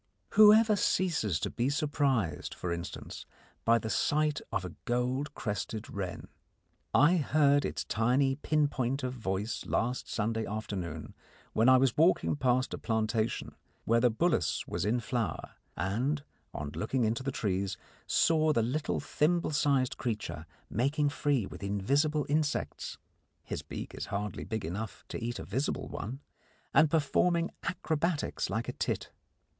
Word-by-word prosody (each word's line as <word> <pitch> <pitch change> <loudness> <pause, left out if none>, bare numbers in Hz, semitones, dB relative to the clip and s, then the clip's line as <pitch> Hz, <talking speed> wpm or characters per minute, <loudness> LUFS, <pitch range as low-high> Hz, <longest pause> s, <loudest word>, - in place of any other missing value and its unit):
Whoever 215 +1 +7
ceases 155 - +1
to - - -1
be 120 +2 0
surprised, 140 - 0
for 85 -1 -3
instance, 85 0 -7 0.4
by 115 +1 +5
the 110 0 -3
sight 150 0 +1
of 95 - -1
a 90 - -6
goldcrested 120 -4 -2
wren? 95 -3 -5 0.6
I 155 +7 +5
heard 145 -2 +3
its - - -3
tiny 130 +4 +2
pinpoint 145 -3 0
of 125 0 -2
voice 105 -2 -3
last 125 +3 -1
Sunday 110 +1 -1
afternoon 95 -7 -5 0.4
when 115 +4 +4
I 130 - +8
was 130 -2 +3
walking 165 0 +3
past 130 -2 +1
a - - -4
plantation 110 0 -1 0.3
where 115 +1 +4
the 125 +1 +4
bullace 115 - +1
was - - -2
in 120 +3 +1
flower, 115 0 -2 0.3
and, 125 - 0 0.3
on 75 -1 -5
looking 120 - -1
into 115 +3 0
the 135 +1 -2
trees, 100 -5 -1 0.3
saw 155 -1 +3
the 115 - +2
little 145 +7 -1
thimble 160 +4 +1
sized 140 -3 +2
creature 115 -4 -4 0.2
making 145 +6 +1
free 145 -5 +1
with - - -9
invisible 140 +10 +1
insects 150 0 -1 0.5
his - - -4
beak - - -7
is - - -5
hardly 105 +1 -3
big 110 -3 -3
enough 100 +6 -5
to - - -5
eat 120 +1 -2
a - - -6
visible 130 +9 -2
one 130 +7 -5 0.5
and 160 -1 +6
performing 165 +3 +2
acrobatics 160 -2 -1
like 115 +2 -2
a - - -3
tit. - - -2
125 Hz, 145 wpm, -31 LUFS, 110-145 Hz, 0.6 s, I